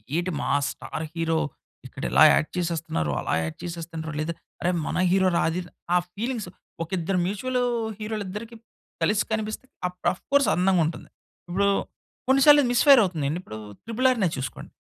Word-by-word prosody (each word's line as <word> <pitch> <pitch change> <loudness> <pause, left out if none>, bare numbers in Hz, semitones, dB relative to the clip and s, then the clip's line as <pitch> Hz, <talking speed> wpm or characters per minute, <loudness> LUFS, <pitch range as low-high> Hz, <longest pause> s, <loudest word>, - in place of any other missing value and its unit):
ఏటి 175 +2 0
మా - - -2 0.2
star 160 - -6
hero 165 -1 0 0.5
ఇక్కడ - - -9
ఇలా 70 +4 +7
యాక్ట్ 155 - +1
చేసేస్తున్నారో 165 - -1
అలా - - -2
యాక్ట్ 80 0 -5
చేసేస్తున్నారో 165 -2 -5
లేదా, 155 +2 -1 0.3
అరె! 175 - +2 0.2
మన - - -2
హీరో 190 0 +4
రా! - - +3
అది 175 +3 -2 0.3
ఆ - - +7 0.2
ఫీలింగ్స్ 230 +1 -3 0.3
ఒక 165 - -10
ఇద్దరు 180 +2 0
మ్యూచుల్ 250 +7 -1 0.4
హీరోలిద్దరికి 215 +1 -5 0.5
కలిసి 210 +5 +2
కనిపిస్తే, 220 +2 -2 0.2
అప్ 180 - -19
అఫ్ 185 - -15
కోర్స్ 280 -1 +4
అందంగుంటది. 180 -3 +1 0.4
ఇప్పుడు 200 +3 +2 0.6
కొన్ని 270 +1 +5
సార్లు 295 -1 +9
ఇది 245 - 0
మిస్ 240 - +4
ఫైర్ 275 -4 +9
అవుతుందండి, 160 -2 -2
ఇప్పుడు 110 - -8 0.3
త్రిబుల్ 230 +3 +1
ఆర్‌నే 210 -8 +1
చూసుకోండి. 130 0 -6
185 Hz, 160 wpm, -25 LUFS, 165-220 Hz, 0.6 s, సార్లు